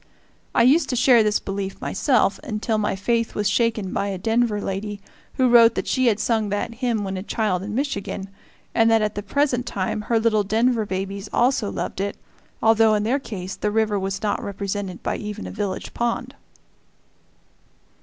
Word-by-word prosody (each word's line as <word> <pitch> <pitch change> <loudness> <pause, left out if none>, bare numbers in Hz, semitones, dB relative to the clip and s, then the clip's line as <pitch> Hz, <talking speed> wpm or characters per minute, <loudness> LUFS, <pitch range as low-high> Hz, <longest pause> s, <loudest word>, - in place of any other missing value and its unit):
I - - +5
used 285 +8 +4
to 250 - 0
share 245 -1 +5
this 210 -1 +2
belief 195 0 -5
myself, 225 -2 +1
until 220 -4 -1
my 205 -2 0
faith 230 +4 -1
was 210 -1 0
shaken 225 -5 0
by 200 - -1
a 195 -1 -3
Denver 225 +2 +1
lady 200 +1 -4 0.4
who 260 - +3
wrote 235 -1 +6
that - - -2
she 260 -1 +1
had 215 -2 +2
sung 220 -3 0
that 205 +3 -2
hymn 235 -3 -1
when 190 -1 -3
a - - -4
child 205 -3 -1
in 210 +2 -5
Michigan, 200 -7 -3 0.5
and 225 -1 +4
that 225 -1 +4
at 210 0 -1
the 205 - -4
present 250 +3 0
time 195 +2 -2
her 230 -1 +3
little 220 -2 +2
Denver 225 +2 +1
babies 195 +1 -4
also 240 -4 +2
loved - - -4
it, 200 0 -3 0.5
although 225 -1 +5
in 210 - 0
their 250 +6 +1
case 195 -7 -6
the 210 - -1
river 215 -1 +1
was 195 +1 -3
not 210 - -1
represented 200 -2 -4
by - - -1
even 210 0 -6
a - - -6
village 200 -3 -4
pond. 235 0 -2
215 Hz, 185 wpm, -23 LUFS, 200-235 Hz, 0.5 s, wrote